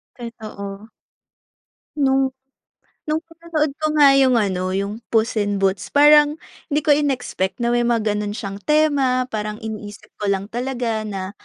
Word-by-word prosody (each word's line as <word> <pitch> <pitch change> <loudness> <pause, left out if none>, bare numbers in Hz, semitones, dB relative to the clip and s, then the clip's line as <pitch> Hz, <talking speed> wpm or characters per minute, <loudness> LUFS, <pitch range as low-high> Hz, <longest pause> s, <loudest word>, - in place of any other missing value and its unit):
Totoo. 215 -3 -8 1.1
Nung 270 -1 +2 0.8
nung 310 +2 -1
pinanood 330 -2 -2
ko 310 0 -1
nga 285 -2 +7
yung 260 -2 +4
ano, 185 -3 0
yung 200 +3 -3
Puss 225 0 +1
in 205 -1 0
Boots, 190 0 0
parang 295 +1 +6 0.3
di 295 -1 0
ko 295 - +3
in-expect 255 -8 0
na 235 - +1
may 240 0 +2
mga 230 -2 +1
gano'n 210 0 -3
siyang 200 -3 -6
tema, 280 -2 +2
parang 210 -1 -3
iniisip 210 -2 -8
ko 210 - -2
lang 200 +1 -1
talaga 240 -3 -2
na 195 -2 -5
235 Hz, 145 wpm, -21 LUFS, 205-285 Hz, 1.1 s, nga